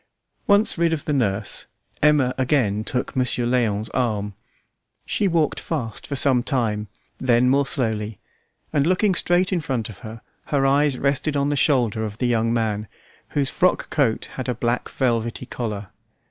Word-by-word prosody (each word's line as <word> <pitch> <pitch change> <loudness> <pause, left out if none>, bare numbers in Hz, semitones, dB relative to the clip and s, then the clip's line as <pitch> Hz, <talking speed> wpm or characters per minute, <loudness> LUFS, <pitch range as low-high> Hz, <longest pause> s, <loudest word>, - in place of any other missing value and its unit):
Once 200 -3 +3
rid 170 -1 +3
of 150 - -3
the 150 - 0
nurse, 105 -6 0 0.3
Emma 145 -4 +4
again 125 -6 +1
took 125 +4 -2
Monsieur 125 -1 +1
Léon's 115 -3 0
arm. 105 -5 -1 0.7
She 205 - 0
walked 165 -4 +1
fast 125 -9 -4
for 140 - -3
some 130 -2 +4
time, 115 -6 -1 0.3
then 125 -1 +3
more 140 +2 +3
slowly, 110 -6 -1 0.6
and 145 0 +2
looking 185 +2 +3
straight 180 +2 +2
in 175 - +1
front 125 -7 -2
of 105 - -11
her, 110 -2 -9 0.2
her 140 -2 +1
eyes 140 0 +3
rested 140 +2 0
on 140 +1 +1
the 145 - 0
shoulder 120 -6 +2
of 105 -1 -5
the 125 - -1
young 115 -1 +1
man, 110 -2 -1 0.5
whose 140 -2 +1
frock - - +1
coat - - +1
had - - -3
a 125 - 0
black 120 +1 -1
velvety 115 -2 -1
collar. 105 -5 -5
125 Hz, 165 wpm, -23 LUFS, 110-145 Hz, 0.7 s, Emma